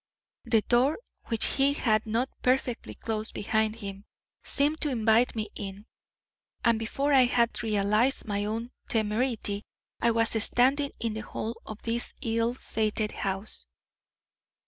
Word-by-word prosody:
The 230 Hz, -3 st, +3 dB
door, 255 Hz, +5 st, +3 dB, 0.3 s
which 225 Hz, -1 st, +1 dB
he 275 Hz, +1 st, +3 dB
had 220 Hz, -6 st, +1 dB
not 230 Hz, +4 st, +1 dB
perfectly 250 Hz, -, 0 dB
closed 220 Hz, 0 st, -3 dB
behind 220 Hz, +1 st, 0 dB
him, 200 Hz, -3 st, -7 dB, 0.4 s
seemed 295 Hz, +2 st, +1 dB
to 300 Hz, -, +2 dB
invite 230 Hz, -1 st, +3 dB
me 215 Hz, -1 st, -3 dB
in, 200 Hz, 0 st, -7 dB, 0.8 s
and 230 Hz, -1 st, +4 dB
before 275 Hz, +6 st, 0 dB
I 260 Hz, -2 st, +7 dB
had 240 Hz, -1 st, +1 dB
realised 215 Hz, +4 st, +1 dB
my 205 Hz, -1 st, -1 dB
own 225 Hz, +3 st, -3 dB, 0.2 s
temerity, 215 Hz, -1 st, 0 dB, 0.4 s
I 235 Hz, -, +4 dB
was 230 Hz, -1 st, +2 dB
standing 275 Hz, +5 st, +3 dB
in 230 Hz, -2 st, -1 dB
the 220 Hz, -, -4 dB
hall 225 Hz, +2 st, -5 dB
of 215 Hz, -1 st, -8 dB
this 235 Hz, +1 st, -2 dB
ill 230 Hz, 0 st, 0 dB
fated 215 Hz, -3 st, -1 dB
house." 195 Hz, +2 st, +1 dB
225 Hz, 140 wpm, -28 LUFS, 215-245 Hz, 0.8 s, I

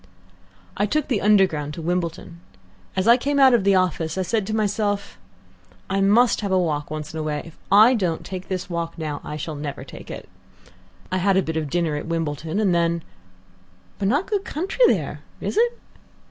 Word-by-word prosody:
"I 205 Hz, -, +1 dB
took 305 Hz, +6 st, -1 dB
the 235 Hz, -6 st, +1 dB
Underground 185 Hz, -8 st, +3 dB
to 170 Hz, -, -6 dB
Wimbledon. 170 Hz, -1 st, -3 dB, 0.6 s
As 190 Hz, +2 st, 0 dB
I 235 Hz, +1 st, +7 dB
came 280 Hz, +2 st, 0 dB
out 265 Hz, -2 st, +7 dB
of 235 Hz, -5 st, +3 dB
the 200 Hz, 0 st, +4 dB
office 170 Hz, -3 st, 0 dB
I 190 Hz, -, +1 dB
said 200 Hz, +2 st, -1 dB
to 215 Hz, -, -1 dB
myself, 205 Hz, -1 st, -1 dB, 0.7 s
'I 195 Hz, 0 st, +1 dB
must 225 Hz, +6 st, +4 dB
have 200 Hz, -2 st, -2 dB
a 190 Hz, -, +4 dB
walk 150 Hz, -5 st, -1 dB
once 155 Hz, 0 st, -6 dB
in 160 Hz, -, -4 dB
a -, -, -1 dB
way. 150 Hz, -1 st, -2 dB
If 165 Hz, -, -12 dB, 0.2 s
I 215 Hz, +5 st, +7 dB
don't 180 Hz, -9 st, -1 dB
take 185 Hz, -1 st, -6 dB
this 185 Hz, -1 st, -3 dB
walk 170 Hz, -1 st, -4 dB
now, 150 Hz, -3 st, -4 dB
I 150 Hz, -, -6 dB
shall 155 Hz, +1 st, -5 dB
never 145 Hz, -1 st, -5 dB
take -, -, -11 dB
it.' -, -, -8 dB, 0.8 s
I 185 Hz, -, +1 dB
had 190 Hz, +1 st, +2 dB
a 190 Hz, -, +3 dB
bit 160 Hz, -, -4 dB
of 155 Hz, -2 st, -2 dB
dinner 165 Hz, -1 st, 0 dB
at 150 Hz, -, -6 dB
Wimbledon, 165 Hz, +2 st, -2 dB
and 200 Hz, -4 st, +2 dB
then 170 Hz, -1 st, +1 dB, 0.4 s
" 90 Hz, 0 st, -32 dB
"But 195 Hz, -, 0 dB
not 290 Hz, -, +2 dB
good 405 Hz, -2 st, -1 dB
country 385 Hz, -, +1 dB
there, -, -, -1 dB, 0.2 s
is -, -, -3 dB
it?" 475 Hz, +2 st, +2 dB
185 Hz, 205 wpm, -23 LUFS, 160-210 Hz, 0.8 s, I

